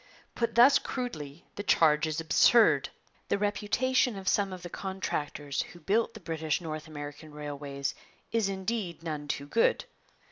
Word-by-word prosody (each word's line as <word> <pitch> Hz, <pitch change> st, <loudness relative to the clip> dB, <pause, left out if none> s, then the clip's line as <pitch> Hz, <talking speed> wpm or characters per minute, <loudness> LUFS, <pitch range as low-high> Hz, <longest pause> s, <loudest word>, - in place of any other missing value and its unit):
Put 235 Hz, -1 st, -1 dB
thus 245 Hz, +4 st, +7 dB
crudely 160 Hz, -, -5 dB
the -, -, -2 dB
charge 160 Hz, -5 st, +4 dB
is 155 Hz, 0 st, -2 dB
absurd. 160 Hz, -, +5 dB, 0.4 s
The -, -, +2 dB
reputation 215 Hz, +5 st, +1 dB
of 190 Hz, -1 st, -8 dB
some 200 Hz, -1 st, +2 dB
of 185 Hz, -1 st, -8 dB
the 175 Hz, -, -6 dB
contractors 150 Hz, -7 st, -3 dB
who 175 Hz, -, -10 dB
built 215 Hz, +8 st, +1 dB
the -, -, -8 dB
British 160 Hz, -4 st, -2 dB
North 155 Hz, -2 st, -6 dB
American 150 Hz, 0 st, -8 dB
railways 145 Hz, -1 st, -4 dB, 0.4 s
is 225 Hz, -3 st, +1 dB
indeed 190 Hz, -3 st, -3 dB
none 150 Hz, -3 st, -4 dB
too 140 Hz, -1 st, -3 dB
good. 225 Hz, +11 st, +2 dB
170 Hz, 150 wpm, -29 LUFS, 150-205 Hz, 0.4 s, thus